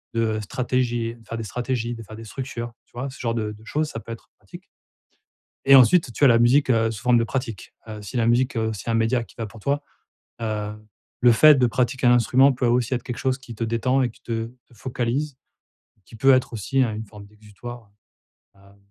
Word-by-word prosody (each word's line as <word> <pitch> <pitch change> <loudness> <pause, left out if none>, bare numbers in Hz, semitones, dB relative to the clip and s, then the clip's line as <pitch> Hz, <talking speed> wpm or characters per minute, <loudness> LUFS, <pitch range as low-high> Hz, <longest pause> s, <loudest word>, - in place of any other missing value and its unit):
de 110 -1 0
stratégie 120 +1 -1
de 115 - -20
faire 115 - -5
des 115 - -4
stratégies, 120 +2 -3
de 115 - -9
faire 110 +1 -11
des 115 - -9
structures, 120 0 -6
tu - - -36
vois? 125 +3 -4
Ce 130 - -12
genre 115 -2 -1
de 110 -2 -2
de 105 +1 -16
choses, 150 +4 -1
ça 115 - -6
peut 115 - -10
être 115 - -14
pratique. - - -13 1.0
Et 135 - +8
ensuite 135 0 +6
tu - - -7
as - - +8
la 115 -1 +5
musique, 130 +4 +4
heu, 115 -2 +3
sous 110 +1 -9
forme 125 -1 +4
de 115 - +2
pratique. 115 -6 -5
Heu, 105 -1 -7
si 105 +5 -8
la 115 -2 +2
musique, 125 +2 +2
heu, 110 0 0
c'est 105 - -8
un 115 - +1
média 115 +2 +1
qui - - -20
va 115 - -4
pour 110 +1 -13
toi, 140 +5 -1 0.6
heu, 105 -2 -3 0.5
le 120 -1 +6
fait 150 +6 +7
de 125 - +4
pratiquer 125 +2 0
un 120 - +7
instrument. 130 +3 +4
Peut 125 -1 -1
aussi 120 +1 +1
être 120 - -2
quelque 120 -2 -6
chose 130 -1 0
qui 130 -3 -11
te 115 - -3
détend 115 +4 +1
et 125 - 0
qui - - -22
te 115 -1 -3
te 120 0 -19
focalise, 130 +4 -3 0.6
et - - -35
qui 115 - -14
peut 135 +4 +5
être 130 -1 0
aussi, 130 +5 0
heu, 120 - +1
une 110 +1 -6
forme 105 -1 -13
d'exutoire, 105 +2 -11 0.7
heu, 95 - -23
hem 100 0 -20
120 Hz, 240 wpm, -23 LUFS, 115-130 Hz, 1.0 s, Et